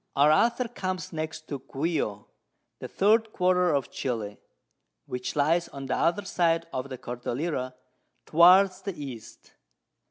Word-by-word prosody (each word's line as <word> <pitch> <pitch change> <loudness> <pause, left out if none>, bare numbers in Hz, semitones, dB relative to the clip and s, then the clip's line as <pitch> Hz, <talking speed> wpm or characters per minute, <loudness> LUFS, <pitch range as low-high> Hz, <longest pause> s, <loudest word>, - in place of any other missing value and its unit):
_] - - -50
Our 145 +2 +5
Author 235 +9 +2
comes 185 -8 -5
next 155 0 -5
to 140 - -4
Guio, 135 -7 -3 0.5
the - - -6
third 220 +2 +2
Quarter 180 -1 +2
of 140 -5 0
Chili, 110 -5 -4 0.7
which 125 0 -5
lies 165 +4 +2
on 140 -1 -8
the - - -1
other 175 +5 +1
side 165 -3 +1
of 130 +1 -4
the 130 - -6
Cordillera, 125 +2 -4 0.5
towards 185 +3 +6
the 195 -1 -5
East. 130 -6 -9
160 Hz, 140 wpm, -27 LUFS, 135-185 Hz, 0.7 s, towards